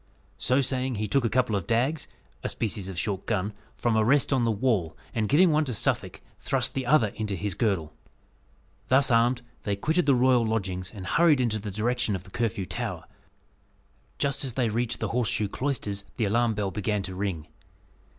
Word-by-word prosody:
So 130 Hz, +2 st, +2 dB
saying, 130 Hz, -1 st, 0 dB
he 105 Hz, 0 st, -2 dB
took 135 Hz, +6 st, +2 dB
a -, -, +2 dB
couple 120 Hz, -3 st, +1 dB
of 95 Hz, -4 st, -3 dB
dags 130 Hz, +7 st, 0 dB, 0.3 s
a -, -, -2 dB
species 100 Hz, -3 st, -2 dB
of 95 Hz, -, -7 dB
short 95 Hz, 0 st, -2 dB
gun 105 Hz, -1 st, -1 dB, 0.2 s
from 120 Hz, -2 st, 0 dB
a 110 Hz, -, +4 dB
rest 140 Hz, +5 st, +3 dB
on 125 Hz, -3 st, +2 dB
the -, -, +2 dB
wall, 105 Hz, -7 st, 0 dB, 0.2 s
and 110 Hz, -2 st, -1 dB
giving 170 Hz, +5 st, +5 dB
one 155 Hz, +1 st, +3 dB
to 125 Hz, -4 st, -3 dB
Suffolk, -, -, 0 dB, 0.2 s
thrust -, -, 0 dB
the 130 Hz, -2 st, -3 dB
other 130 Hz, -6 st, +4 dB
into 105 Hz, -1 st, -4 dB
his 100 Hz, +2 st, -2 dB
girdle. 95 Hz, -7 st, -1 dB, 0.9 s
Thus 130 Hz, 0 st, +3 dB
armed, 120 Hz, +2 st, +3 dB, 0.2 s
they 100 Hz, -, -1 dB
quitted 160 Hz, -, 0 dB
the 140 Hz, -, +5 dB
royal 125 Hz, -1 st, +4 dB
lodgings, 95 Hz, -5 st, -2 dB
and 100 Hz, -4 st, -8 dB
hurried 155 Hz, -, +4 dB
in 125 Hz, -2 st, +2 dB
the 110 Hz, -1 st, -4 dB
direction 115 Hz, +2 st, 0 dB
of 95 Hz, -, -6 dB
the 95 Hz, -, -16 dB
Curfew 105 Hz, -4 st, -1 dB
Tower. -, -, -4 dB, 1.1 s
Just 140 Hz, 0 st, 0 dB
as 130 Hz, -4 st, -3 dB
they 125 Hz, -4 st, +1 dB
reached 120 Hz, +2 st, -1 dB
the -, -, -1 dB
Horseshoe 115 Hz, -3 st, 0 dB
Cloisters, 105 Hz, -5 st, -2 dB
the 115 Hz, -, +1 dB
alarm 115 Hz, +2 st, +2 dB
bell 100 Hz, -2 st, -1 dB
began 105 Hz, 0 st, -1 dB
to 95 Hz, 0 st, -5 dB
ring. 90 Hz, -5 st, -3 dB
115 Hz, 195 wpm, -27 LUFS, 100-130 Hz, 1.1 s, giving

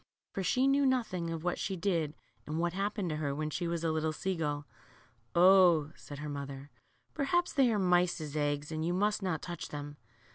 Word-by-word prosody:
For 195 Hz, -, -3 dB
she 250 Hz, +8 st, +2 dB
knew 280 Hz, +1 st, +4 dB
nothing 220 Hz, -10 st, 0 dB
of 165 Hz, -1 st, -4 dB
what 175 Hz, 0 st, -1 dB
she 190 Hz, -, -2 dB
did 170 Hz, -5 st, -1 dB, 0.3 s
and 155 Hz, +1 st, -3 dB
what 170 Hz, 0 st, 0 dB
happened 200 Hz, -2 st, -1 dB
to 155 Hz, -, -2 dB
her 145 Hz, -2 st, -2 dB
when 155 Hz, +1 st, -2 dB
she 175 Hz, +3 st, -2 dB
was 170 Hz, -1 st, -2 dB
a 165 Hz, -, +1 dB
little 155 Hz, 0 st, 0 dB
sea 190 Hz, +4 st, -2 dB
gull, 145 Hz, -3 st, -2 dB, 0.7 s
0," 175 Hz, -4 st, +6 dB
said 145 Hz, -, -10 dB
her 150 Hz, +1 st, -5 dB
mother, 140 Hz, -1 st, -6 dB, 0.4 s
perhaps 345 Hz, +5 st, +1 dB
they 265 Hz, -4 st, +4 dB
are 215 Hz, -, +1 dB
mice's 175 Hz, -5 st, +1 dB
eggs, 145 Hz, 0 st, -1 dB
and 155 Hz, 0 st, -2 dB
you 175 Hz, +2 st, 0 dB
must 210 Hz, +3 st, +1 dB
not' 180 Hz, -5 st, -2 dB
touch 175 Hz, -1 st, -5 dB
them." 145 Hz, 0 st, -7 dB
170 Hz, 205 wpm, -32 LUFS, 150-190 Hz, 0.7 s, 0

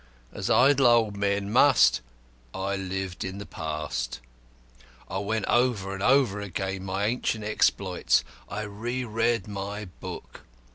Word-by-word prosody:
As -, -, -4 dB
idle 135 Hz, 0 st, +5 dB
old 115 Hz, -3 st, +4 dB
men 100 Hz, 0 st, -1 dB
must, 135 Hz, +2 st, +5 dB, 0.5 s
I 95 Hz, +1 st, -1 dB
lived 95 Hz, -1 st, -4 dB
in 95 Hz, +1 st, -5 dB
the 100 Hz, -, -7 dB
past. 75 Hz, -6 st, -4 dB, 0.9 s
I 95 Hz, -, -3 dB
went 110 Hz, +2 st, -1 dB
over 120 Hz, -6 st, +1 dB
and 95 Hz, -, -6 dB
over 125 Hz, -4 st, +3 dB
again 95 Hz, -1 st, -4 dB
my 95 Hz, +2 st, -1 dB
ancient 115 Hz, -1 st, -1 dB
exploits; 100 Hz, -3 st, +2 dB, 0.3 s
I 105 Hz, +1 st, -4 dB
re 115 Hz, +5 st, -4 dB
read 115 Hz, -1 st, 0 dB
my 100 Hz, +1 st, -5 dB
book. 90 Hz, -, -9 dB
100 Hz, 135 wpm, -27 LUFS, 95-115 Hz, 0.9 s, idle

